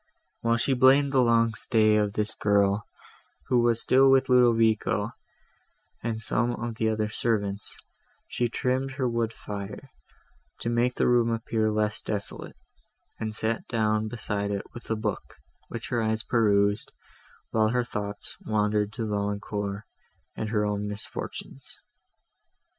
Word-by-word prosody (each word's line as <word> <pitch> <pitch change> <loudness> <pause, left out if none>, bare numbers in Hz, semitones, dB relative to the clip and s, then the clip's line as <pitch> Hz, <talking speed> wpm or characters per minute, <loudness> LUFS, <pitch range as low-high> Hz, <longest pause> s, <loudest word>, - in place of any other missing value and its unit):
While 115 0 +1
she 135 +3 +1
blamed 135 +2 +5
the 135 -2 +4
long 115 -1 +3
stay 110 0 +3
of 105 -1 +1
this 105 +1 -1
girl, 100 0 +2 0.6
who 125 - +4
was 120 -1 +2
still 135 +1 +5
with 135 0 +4
Ludovico 115 -3 +3 0.9
and 115 -1 -2
some 120 +2 0
other 115 -1 -2
of - - -3
the 110 -1 0
servants, 105 -2 -1 0.5
she 120 -1 -1
trimmed 130 +3 -1
her 135 -2 -1
wood 115 -1 0
fire, 105 +4 -7 0.7
to 115 - -1
make 120 +1 +1
the - - +2
room 120 -1 +4
appear 115 -1 0
less 105 0 0
desolate, 100 -2 -5 0.6
and 110 -1 -3
sat 110 +1 -1
down 110 -2 +1
beside 105 -3 -3
it 100 -1 -2
with 120 - -11
a 115 - +1
book, 105 -2 -4 0.3
which 115 -2 -6
her 120 -2 0
eyes 110 0 0
perused, 105 -3 +2 0.6
while 110 -1 +3
her 125 +1 +1
thoughts 105 -3 -6
wandered 105 -1 +1
to 115 -2 -3
Valancourt, 100 0 -3 0.5
and 110 - -3
her 105 -1 +1
own 105 0 -2
misfortunes. 105 0 -4
110 Hz, 140 wpm, -27 LUFS, 105-120 Hz, 0.9 s, blamed